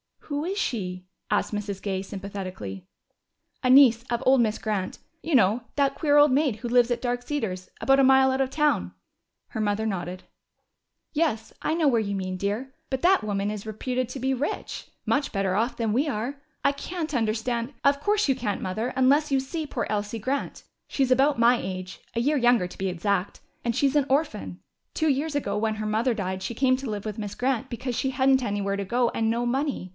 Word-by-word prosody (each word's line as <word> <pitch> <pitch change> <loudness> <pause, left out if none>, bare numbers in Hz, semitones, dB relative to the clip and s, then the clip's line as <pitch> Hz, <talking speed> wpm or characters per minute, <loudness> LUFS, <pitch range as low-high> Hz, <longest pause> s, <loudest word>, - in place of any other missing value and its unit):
"Who 290 +2 -1
is 385 +3 -2
she?" 185 - -2 0.2
asked - - 0
Mrs. 205 -2 -4
Gay 190 -2 -2
sympathetically. 185 - -7 0.8
"A 255 - +2
niece 250 -3 +7
of 240 +1 -1
old 265 0 +5
Miss 220 -2 +2
Grant. 205 -4 -2 0.2
You 320 -3 0
know 225 +1 +4
that 275 -1 +2
queer 295 0 +2
old 290 -1 +7
maid 275 -3 +2
who 235 +3 -6
lives 245 0 +4
at 240 - -1
Dark 245 -1 -1
Cedars. 220 -10 -3
About 270 0 +4
a - - +6
mile 265 0 +6
out 260 - -1
of 265 - +1
town." 270 - +1 0.6
Her - - -5
mother 215 +1 0
nodded. 185 -3 -3 0.9
"Yes, 290 -9 0
I - - 0
know 325 -2 +2
where 235 -3 +3
you 200 -2 -2
mean, 185 -1 -3
dear. 210 +8 -3 0.2
But 265 -1 -2
that 375 - +4
woman 205 0 -1
is 210 -1 -6
reputed 250 +4 -2
to 265 - -6
be 265 +1 +1
rich 270 +3 -4 0.2
much 285 0 0
better 195 -2 0
off 225 +6 0
than 225 -2 -1
we 265 +8 +1
are. 275 +2 -3 0.2
I 280 - +4
can't 320 +3 -5
understand 235 +2 -1
" - - -44
"Of 280 0 +4
course 410 +1 +1
you - - +5
can't, 225 -6 -2
Mother, 215 +6 -2
unless 280 +3 +3
you 270 - +3
see 305 +4 -4
poor - - -2
Elsie 210 +1 -2
Grant. 260 +6 -3 0.2
She's 265 -2 0
about 270 +1 +4
my 240 +1 +5
age 185 0 -6 0.2
a 230 - +1
year 290 +4 +2
younger, 240 -7 +3
to - - -13
be 195 - -1
exact 185 +1 -1 0.2
and 235 -1 0
she's 280 +1 +2
an 285 - +3
orphan. 265 - -1 0.3
Two 315 -1 +1
years 290 +2 0
ago, 285 - -1
when 220 0 0
her 215 0 -4
mother 225 +4 +1
died, 190 -3 -3
she 235 - -4
came 255 +1 +3
to 265 -2 -5
live 210 -1 -4
with 215 0 -4
Miss 205 -1 -5
Grant 260 0 -1
because 245 0 -4
she 265 +2 0
hadn't 265 0 +3
anywhere 200 -3 -1
to 200 - -3
go 240 +4 +1
and 225 -1 0
no 235 +2 0
money. 265 -5 -1
240 Hz, 210 wpm, -26 LUFS, 205-270 Hz, 0.9 s, niece